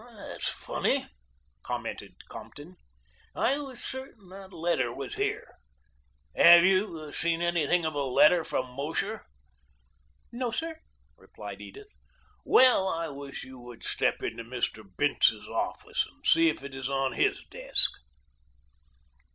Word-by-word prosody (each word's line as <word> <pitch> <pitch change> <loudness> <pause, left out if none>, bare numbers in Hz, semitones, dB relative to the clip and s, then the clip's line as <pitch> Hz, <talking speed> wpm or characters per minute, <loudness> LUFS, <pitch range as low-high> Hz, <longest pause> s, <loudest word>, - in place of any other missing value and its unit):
"That's 200 - -4
funny," - - -1 0.6
commented - - -6
Compton. 160 +6 -11 0.6
"I 275 +4 +2
was 265 -4 -8
certain 260 -7 -6
that 190 0 -11
that 185 - -15
letter 160 -8 0
was 135 +2 -6
here. - - -3 0.8
Have 170 0 +9
you 185 -6 +1
seen 165 +1 +1
anything 175 0 +2
of 155 - -1
a 145 - -1
letter 150 +6 +5
from 125 -4 -3
Mosher?" 145 - -3 1.0
"No, 245 0 -2
sir," 320 +6 -4 0.4
replied - - -10
Edith. 420 0 -11 0.5
"Well, 250 -7 +6
I 165 -3 -2
wish 140 -1 -7
you 130 -1 -11
would 120 -1 -12
step - - 0
into 115 - -4
Mr. 115 -2 -3
Bince's - - +2
office, - - -2
and - - -23
see 165 0 +5
if 155 - -4
it 140 -1 -8
is 135 0 -4
on 135 -1 0
his - - +1
desk." - - +1
165 Hz, 135 wpm, -28 LUFS, 135-195 Hz, 1.0 s, Have